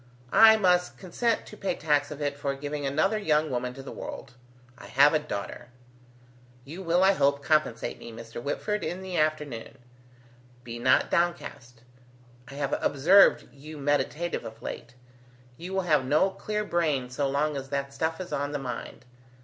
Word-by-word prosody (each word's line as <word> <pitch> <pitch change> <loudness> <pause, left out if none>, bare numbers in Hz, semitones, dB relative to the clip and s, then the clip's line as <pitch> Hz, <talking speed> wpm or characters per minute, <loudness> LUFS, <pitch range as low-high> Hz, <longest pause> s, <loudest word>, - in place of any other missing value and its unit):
I 220 0 +8
must 180 -3 +2
consent 225 +5 -1
to - - -11
pay 195 -4 -2
tax 145 -2 +1
of 150 0 -6
it 145 -1 -1
for 140 -1 -3
giving 145 0 -4
another 175 +10 +1
young 155 -6 +1
woman 125 0 -3
to 135 - -9
the - - -8
world. 125 - -8 0.4
I - - -12
have 145 +3 +5
a 155 - +3
daughter! 120 -7 -6 1.0
You 165 +7 -8
will, 175 +1 +2
I 190 - +6
hope, 140 -6 +1
compensate 155 -7 0
me, 115 - -9
Mr. 115 +1 -9
Whitford, 210 - -2
in 185 +2 -4
the 185 -1 -5
afternoon. 150 -5 -2 0.9
Be 120 -1 -7
not 130 +2 +3
downcast. 155 -9 -2 0.6
I 140 - -10
have 140 -1 -1
observed 180 +9 +5
you 150 +2 -11
meditative 145 +4 -1
of 115 0 -10
late. 120 - -7 0.6
You 175 +7 -8
will 190 - +1
have 155 -6 +2
no 150 +9 +2
clear 210 +2 -3
brain 150 -9 0
so 135 +2 -1
long 145 +2 0
as 135 -1 -6
that 140 0 -3
stuff 160 +4 -2
is 185 - -6
on 145 +1 -2
the - - 0
mind. 130 -3 -7
145 Hz, 175 wpm, -27 LUFS, 135-175 Hz, 1.0 s, I